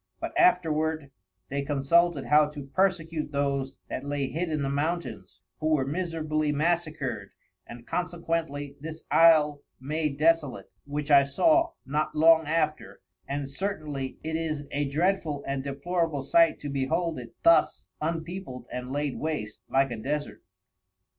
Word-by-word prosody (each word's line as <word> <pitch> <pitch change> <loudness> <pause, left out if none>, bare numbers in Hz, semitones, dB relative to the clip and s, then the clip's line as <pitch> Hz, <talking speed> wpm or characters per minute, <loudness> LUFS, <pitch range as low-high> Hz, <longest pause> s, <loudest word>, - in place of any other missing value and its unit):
But - - -4
afterward 160 -4 +2 0.4
they 140 +1 -1
consulted 145 +2 +2
how 150 0 +5
to 150 -1 -8
persecute 165 -2 0
those 140 -1 -1
that - - -5
lay 145 -1 -2
hid 170 +2 -2
in 155 -2 -1
the - - -1
Mountains, 155 +5 -3 0.2
who 155 - -1
were 135 -3 0
miserably 155 -1 -1
massacred, 150 - -1 0.4
and 120 0 -10
consequently 165 -5 -3
this 160 +2 -8
Isle 155 -3 +5 0.2
made 150 +1 -2
desolate, 155 -4 +1 0.2
which 145 +1 -3
I 140 -1 +8
saw 330 - +3
not 150 +3 -1
long 160 0 +5
after, 155 -1 -1 0.3
and 140 0 -2
certainly 145 -5 -4
it 160 0 -3
is 155 -3 -3
a 145 0 -1
dreadful 155 -2 0
and 135 -1 -2
depolorable 145 +1 -1
sight 165 +3 +4
to 145 - -4
behold 140 +4 -1
it 120 -2 -11
thus 335 0 +4 0.2
unpeopled 160 -4 -4
and 125 +1 -5
laid 145 -1 -2
waste, 145 -10 -4
like 135 -1 +2
a 120 - -4
Desert. 145 +6 -3
150 Hz, 140 wpm, -27 LUFS, 140-165 Hz, 0.4 s, I